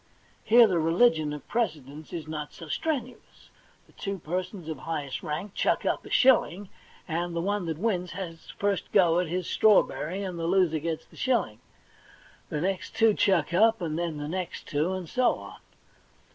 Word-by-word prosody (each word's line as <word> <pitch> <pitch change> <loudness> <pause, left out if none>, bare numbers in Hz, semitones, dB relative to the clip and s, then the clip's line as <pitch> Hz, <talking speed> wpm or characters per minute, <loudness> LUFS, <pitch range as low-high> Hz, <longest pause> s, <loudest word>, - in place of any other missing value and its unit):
Here 235 +2 +7
the 185 -5 +1
rehgion 165 -1 +3
of 150 -1 -8
precedence 155 - -3
is 160 -3 -6
not 150 -1 -5
so 165 - -10
strenuous; 255 - -4 0.3
the - - -25
two 200 -1 -4
persons 180 +1 -4
of 160 -4 -5
highest 145 -4 -4
rank 180 +7 -4
chuck - - +1
up - - 0
a - - -11
shilling, 205 -7 +3 0.4
the 170 0 -2
one 200 0 -1
that 160 -2 -2
wins 180 -3 -1
has 170 -3 -7
first 200 -1 -1
go 175 -4 +4
at 180 - 0
his 180 +2 -2
strawberry, 195 -3 +2
and 180 -3 -5
the 165 - -2
loser 175 -3 +2
gets 160 +1 -3
the - - -20
shilling. 215 - 0 0.9
The 150 - -2
next 190 +1 -2
two 225 -1 +5
chuck 180 -6 +2
up, 220 +5 +5
then 165 -5 -3 0.2
the 145 0 -4
next 180 +2 -4
two, 155 +3 0
and 185 -2 -5
so 250 +8 +2
on. - - -11
175 Hz, 170 wpm, -27 LUFS, 160-200 Hz, 0.9 s, Here